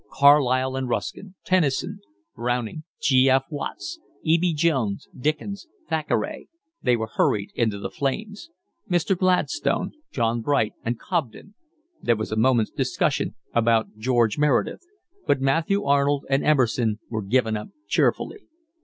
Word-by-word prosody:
Carlyle 130 -2 +4
and 130 -1 -2
Ruskin, 195 +9 -4
Tennyson, 165 -8 +1 0.4
Browning, 120 +5 -2
G. 130 -1 +4
F. 135 +1 +4
Watts, 320 - -5 0.2
E. 165 +1 +3
B. 180 0 +2
Jones, 145 -10 0
Dickens, 155 - -3 0.2
Thackeray, 160 - -2 0.3
they 125 - +3
were 110 -1 -2
hurried 100 -1 +1
into 110 -4 0
the 100 - -5
flames; 205 - -3 0.4
Mr. 175 +2 +2
Gladstone, 185 0 +1 0.2
John 115 -1 0
Bright, 115 -3 +1
and 120 +1 -2
Cobden; 170 - -3 0.5
there 120 - +2
was 110 0 -4
a - - 0
moment's 115 -1 +3
discussion - - 0 0.2
about 115 -2 +2
George 120 0 +2
Meredith, 150 -3 +1 0.5
but 140 - +3
Matthew 165 +9 +1
Arnold 140 -1 +2
and 135 +1 +2
Emerson 120 -6 +2
were 110 -2 -3
given 110 +2 +1
up 105 - -5 0.2
cheerfully. 430 - +1
135 Hz, 135 wpm, -24 LUFS, 115-160 Hz, 0.5 s, Carlyle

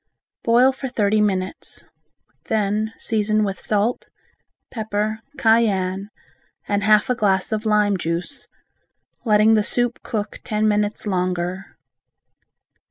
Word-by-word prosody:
Boil 245 +3 +5
for 265 0 -6
thirty 215 -3 +1
minutes. 190 -3 -2 0.6
Then 215 0 0
season 215 -1 +1
with 195 -2 -3
salt, 215 +3 0 0.6
pepper, 215 -1 -2 0.2
cayenne, 200 -5 +2 0.6
and 205 0 0
half 215 +1 +4
a - - +4
glass 195 -5 +1
of 220 0 -2
lime 210 -2 +3
juice, 170 +10 -4 0.8
letting 215 0 +5
the 215 - +4
soup 245 +3 0
cook 210 -4 -4
ten 215 -2 0
minutes 210 0 0
longer. 180 -1 -2
210 Hz, 110 wpm, -21 LUFS, 200-220 Hz, 0.8 s, Boil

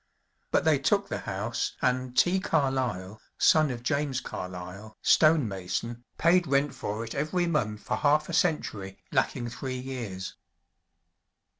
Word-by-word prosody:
But - - +2
they 155 -3 +4
took 200 +8 +2
the - - -2
house, 100 +4 -3
and 125 -1 0
T. 185 +2 +4
Carlyle, 130 - -1 0.2
son 155 -2 +5
of 120 -2 -5
James 140 -1 0
Carlyle, 90 +2 -7
stone 155 -5 +5
mason, 100 +5 -4
paid 175 +1 +4
rent 140 0 +2
for 105 +2 -4
it 115 - -6
every 155 +5 0
month 105 -11 -1
for - - -2
half 150 +1 +3
a 170 - -6
century, 110 - 0
lacking 120 -1 0
three 130 +1 -4
years. 120 -8 -6
130 Hz, 140 wpm, -28 LUFS, 105-155 Hz, 0.2 s, son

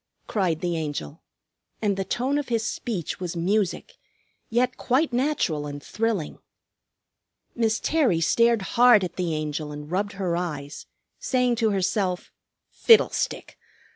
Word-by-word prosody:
cried 180 -7 -1
the 175 -1 -1
Angel, 145 - -4 0.6
and 205 -2 0
the 195 - -2
tone 260 +8 -1
of 290 - -5
his 230 -2 0
speech 205 -11 -4
was 180 -2 -4
music, 190 +2 -1 0.5
yet 245 +3 +1
quite 260 +2 +1
natural 240 - 0
and 145 0 -7
thrilling. 220 -8 -2 1.1
Miss 225 -2 +1
Terry 275 - +2
stared 230 +5 +3
hard 240 -4 +6
at 180 -1 -4
the 175 -4 -1
Angel 150 0 -3
and 150 +1 -8
rubbed 200 +3 -1
her 185 -3 -2
eyes, 150 -5 -5 0.3
saying 250 -2 +1
to 220 -1 +2
herself, 190 -2 -1 0.4
"Fiddlestick! 455 -2 +3
195 Hz, 135 wpm, -25 LUFS, 165-235 Hz, 1.1 s, hard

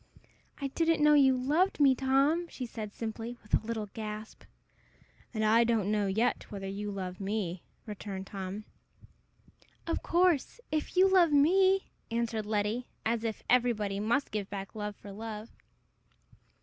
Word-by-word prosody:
"I 275 -1 -2
didn't 325 +1 +1
know 300 0 +7
you 265 -3 +5
loved 305 +10 +1
me, 275 -2 +6
Tom!" 275 +6 +2
she 255 - -6
said, 220 -3 -6
simply, 230 +1 -5
with 210 - -19
a - - +4
little 220 -1 -3
gasp. 215 0 -6 0.9
"And 215 -2 -1
I 225 +2 +5
don't 225 -4 +1
know 210 -2 +1
yet 220 +6 0
whether 195 -2 -6
you 205 +2 -4
love 185 -2 -5
me," 195 -3 -2 0.2
returned 200 -2 -6
Tom. 195 +2 -6 1.2
"Of 330 - -1
course, 350 - +2
if 310 +3 -2
you 375 +1 +7
love 365 -4 +5
me," 375 +7 +4 0.2
answered 230 -2 -2
Letty, 215 +3 -1 0.2
as 230 0 0
if 225 -2 -3
everybody 220 -5 +2
must 230 +7 0
give 205 -2 -3
back 195 -1 -6
love 210 -1 -4
for 200 - -11
love. 215 +1 -7
225 Hz, 150 wpm, -30 LUFS, 210-275 Hz, 1.2 s, know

